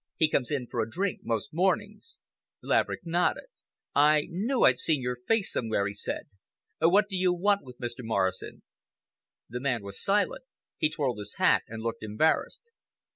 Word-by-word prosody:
He 160 - +4
comes 130 -5 0
in 140 -4 -1
for 120 -1 -2
a 110 - -3
drink 190 - -2
most 115 +5 -3
mornings." 205 - -1 0.4
Laverick - - 0
nodded. 175 +1 +1 0.5
"I 150 +1 +5
knew 225 +9 0
I'd - - +5
seen 155 -3 +2
your 125 0 -2
face 225 -3 +2
somewhere," 110 -4 0
he 100 - -3
said. 105 - -5 0.5
"What 195 +6 +4
do 195 - -5
you 185 -1 +2
want 200 +3 +2
with 125 -2 -12
Mr. 120 0 -6
Morrison?" 100 -6 -2 0.8
The 125 - -5
man 125 -5 -1
was 100 0 -5
silent. 205 +1 +1 0.4
He 155 - +3
twirled 135 -7 -2
his 105 0 -4
hat - - +4
and 110 0 -7
looked 115 -1 -3
embarrassed. 110 - 0
145 Hz, 170 wpm, -28 LUFS, 115-185 Hz, 0.8 s, I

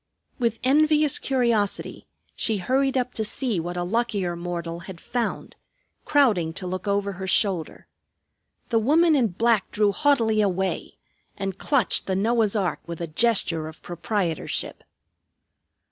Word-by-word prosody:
With 230 -2 0
envious 300 +2 +3
curiosity 235 -6 -1 0.3
she 220 -2 +1
hurried 265 +6 +1
up 250 -1 -1
to 220 - -1
see 220 -1 -1
what 175 +2 -4
a 175 - -1
luckier 200 -3 -1
mortal 170 -1 -5
had 175 0 -10
found, 240 +4 -3 0.5
crowding 210 - +2
to 185 - -6
look 185 +3 -4
over 200 0 0
her 190 0 -6
shoulder. 185 -4 0 0.8
The 230 - +3
woman 315 +7 +4
in 250 -5 +3
black 220 +2 +1
drew 205 -1 +2
haughtily 230 -5 +2
away 190 -2 -2 0.4
and 195 -2 -3
clutched 275 -9 +2
the 190 - 0
Noah's 225 +1 +2
ark 190 -4 0
with 170 -1 -6
a 170 - -2
gesture 165 -3 0
of 160 - -12
proprietorship. 175 -1 -3
205 Hz, 140 wpm, -24 LUFS, 180-240 Hz, 0.8 s, woman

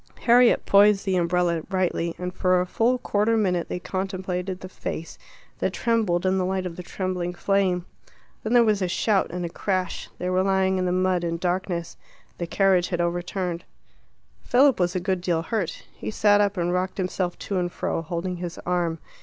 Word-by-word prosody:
Harriet 245 0 +5
poised 200 0 +5
the 190 -1 +1
umbrella 175 -1 +1
rightly, 180 -3 -1
and 180 0 -4
for 185 0 +2
a 180 - 0
full 230 +7 +1
quarter 220 -1 +1
minute 180 -5 0
they - - -2
contemplated 185 0 -3
the 185 - -7
face 165 -3 -6 0.4
that - - -1
trembled 215 -7 +1
in 190 0 +2
the - - +1
light 185 0 -1
of 175 -2 -5
the 180 - -6
trembling 180 -1 -3
flame. 185 -2 +1 0.6
Then 220 - -2
there 240 -1 +7
was 210 -3 +2
a 185 - +1
shout 195 +2 +1
and 180 0 -4
a - - -3
crash. 185 +1 -2
They 180 - -3
were 185 0 +2
lying 190 -1 +2
in 185 - 0
the - - +1
mud 185 -1 +1
in 170 0 -1
darkness. 175 -1 -2 0.4
The 170 - -2
carriage 185 -1 +3
had 175 - -2
overturned. 175 0 -2 0.8
Philip 265 0 +4
was 175 +1 +1
a - - +1
good 185 0 -1
deal 170 -2 0
hurt. 190 -4 -3
He - - -6
sat 205 -1 +4
up 205 -1 +1
and 175 0 0
rocked 185 +1 -1
himself 185 -1 -2
to 195 -2 -2
and 175 -1 -1
fro, - - -2
holding 175 +2 -4
his 175 -1 -6
arm. 175 -2 0
185 Hz, 195 wpm, -25 LUFS, 175-195 Hz, 0.8 s, there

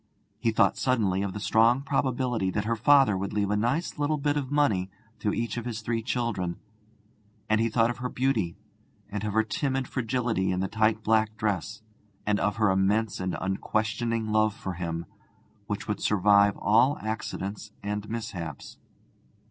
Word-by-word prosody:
He 115 - +1
thought 110 -3 +3
suddenly 105 -8 +1
of 100 -2 -2
the 105 - -5
strong 115 +5 +3
probability 130 -7 0
that 105 +2 -2
her 115 +1 +1
father 135 -1 +5
would 95 +1 -3
leave 100 -1 0
a - - +2
nice 125 +10 -1
little 150 +1 +1
bit 145 0 0
of 140 -3 -2
money 110 -11 +2 0.3
to 105 - 0
each 115 +2 -2
of 120 - -4
his 115 -2 -4
three 115 0 -1
children; 110 -7 -2 0.9
and 110 0 +2
he 115 - +2
thought 115 +1 +2
of 120 - -8
her 125 +1 -3
beauty, 115 -11 0 0.5
and 105 0 -3
of 105 -1 -2
her 110 +1 +3
timid 135 0 -1
fragility 115 -6 -1
in 90 - -1
the 95 - 0
tight 110 +1 +1
black 110 0 +2
dress, 100 -1 -2 0.4
and 105 -1 +1
of 105 - 0
her 105 -2 +3
immense 100 +3 +1
and 95 -1 -2
unquestioning 110 +3 -1
love 110 -1 +2
for 95 - -5
him, 85 -1 -4 0.6
which - - -4
would - - -2
survive 100 0 +4
all 120 +7 +3
accidents 105 -1 -4
and 105 +1 -3
mishaps. 95 -10 -6
110 Hz, 170 wpm, -27 LUFS, 100-120 Hz, 0.9 s, father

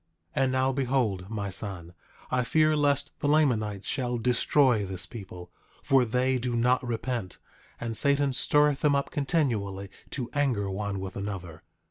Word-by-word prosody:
9:3 135 - +3
And 130 - +1
now 130 +1 +2
behold, 125 -8 0
my 100 -3 -3
son, 90 -2 -5 0.4
I 125 0 +2
fear 155 +4 +3
lest 145 -1 +1
the - - -1
Lamanites 115 -10 +1
shall 125 -3 0
destroy 125 0 +3
this 95 -2 -4
people; 90 -5 -10 0.3
for 135 -2 +4
they 125 +2 +1
do 120 0 -2
not 125 +2 +2
repent, 120 -4 -3 0.4
and 115 -1 -3
Satan 140 +1 +2
stirreth 145 +2 +3
them 145 -2 +3
up 140 - -1
continually 110 - -1 0.2
to 125 -4 -4
anger 125 -9 0
one 100 0 -3
with 95 -1 -6
another. 95 -5 -6
120 Hz, 155 wpm, -28 LUFS, 100-135 Hz, 0.4 s, for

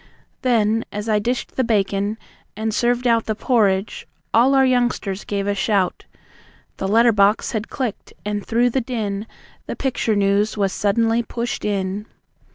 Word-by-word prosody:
Then, 225 -3 +2
as 210 +1 -5
I 215 -1 +2
dished 240 +4 -3
the 260 - +3
bacon, 205 -2 0 0.4
and 220 0 -2
served 245 +2 +1
out 230 -2 +2
The 220 - 0
porridge, 205 -4 +1 0.3
all 255 +4 +5
our 265 0 +5
youngsters 245 -6 0
gave 200 -1 -2
a 205 - +1
shout. 200 -2 0 0.7
The 190 - -2
letter 230 +4 +5
box 205 +1 +2
had 220 -2 -3
clicked, 250 -6 -4
and 205 -1 -2
through 240 +2 +2
the 265 - +1
din 220 -4 -3 0.4
The - - -4
Picture 245 -5 -1
News 205 +2 +1
was 195 -2 0
suddenly 225 +3 +1
pushed 235 0 -4
in. 200 0 -2
220 Hz, 160 wpm, -21 LUFS, 200-235 Hz, 0.7 s, all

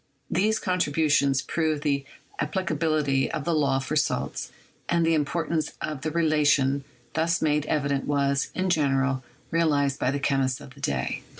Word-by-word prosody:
These 215 +5 +2
contribu 160 -5 +1
tions 140 -2 +3
proved 155 -3 -1
the 140 -2 0 0.3
applicability 155 -4 0
of 155 -3 -3
the 170 - +1
law 140 -4 +2
for 135 +3 -3
salts, 150 - -1 0.4
and 170 -1 +2
the 165 - +3
importance 155 +1 -1
of 150 -3 -4
the 155 - -1
relation 150 -4 +2 0.3
thus 165 +1 +1
made 150 -1 +1
evident 140 -2 0
was, 140 -1 +1
in 185 0 0
general, 135 -4 +1 0.3
realized 145 -4 +2
by - - +1
the 140 +1 -1
chemists 135 -2 +1
of 130 - -12
the 140 - -17
day. 65 - -1
150 Hz, 160 wpm, -26 LUFS, 140-160 Hz, 0.4 s, tions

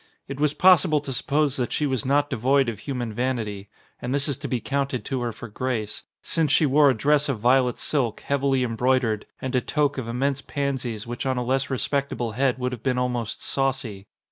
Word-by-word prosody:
It 140 0 -6
was 150 0 +1
possible 180 -4 +5
to 140 -2 -5
suppose 145 +2 +1
that 125 -2 -1
she 150 - 0
was 130 -4 -1
not 145 +1 +3
devoid 130 +1 +2
of 110 -3 -6
human 120 -5 -4
vanity 110 -5 -2 0.3
(and 125 +3 -1
this 140 +1 +1
is 140 - -1
to 145 - -5
be 125 -2 -1
counted 135 +1 -2
to 130 -2 -2
her 120 -1 -1
for 115 +2 -9
grace) 110 -1 -3 0.2
since 160 -4 0
she 155 - +4
wore 145 +1 +5
a 130 - +2
dress 145 +5 +2
of 130 -6 -1
violet 125 +1 +3
silk, 125 -7 -1
heavily 135 -2 +1
embroidered, 120 -2 +1
and 130 0 -4
a 125 - +3
toque 145 -1 0
of 115 - -8
immense 135 +4 -1
pansies 130 -7 -3
which 120 +3 -4
on 130 -1 0
a 125 - 0
less 135 +2 0
respectable 135 -3 -1
head 130 +3 +1
would 125 0 -2
have 125 -3 -6
been 130 -1 0
almost 125 -3 -2
saucy. 130 -8 -2
130 Hz, 210 wpm, -24 LUFS, 120-140 Hz, 0.3 s, possible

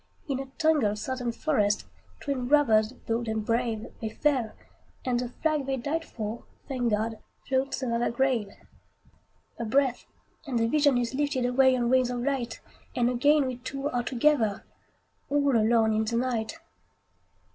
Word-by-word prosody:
In 270 -3 -1
a 270 - -5
tangled 300 -11 +2
Southern 245 +2 -3
forest, 215 -6 +1 0.4
Twin 265 -4 -2
brothers 230 -7 +4
bold 235 -2 -3
and 220 -1 -2
brave, 230 -1 0 0.2
They 220 - -2
fell; 250 -1 0 0.5
and 245 -2 +1
the 245 -1 -3
flag 300 +1 -1
they 270 -1 0
died 300 +6 -2
for, 220 +1 -5 0.2
Thank 250 -3 -1
God! 220 +1 -1 0.3
floats 265 0 0
over 235 -2 0
their 240 - +1
grave. 235 -4 +1 1.1
A - - -2
breath, 260 +2 +1 0.4
and 255 -3 -1
the 230 0 +2
vision 285 0 +3
is 240 0 -1
lifted 270 -2 0
Away 260 +1 +4
on 240 0 0
wings 255 -1 +4
of 245 -1 -2
light, 250 -3 -2 0.3
And 245 0 +2
again 285 +4 +3
we 255 -2 -3
two 275 +3 -4
are 245 -3 0
together, 240 -4 +1 0.7
All 285 -2 +2
alone 220 0 +3
in 215 +1 +2
the 230 +2 -2
night. 240 0 -1
245 Hz, 160 wpm, -27 LUFS, 230-275 Hz, 1.1 s, brothers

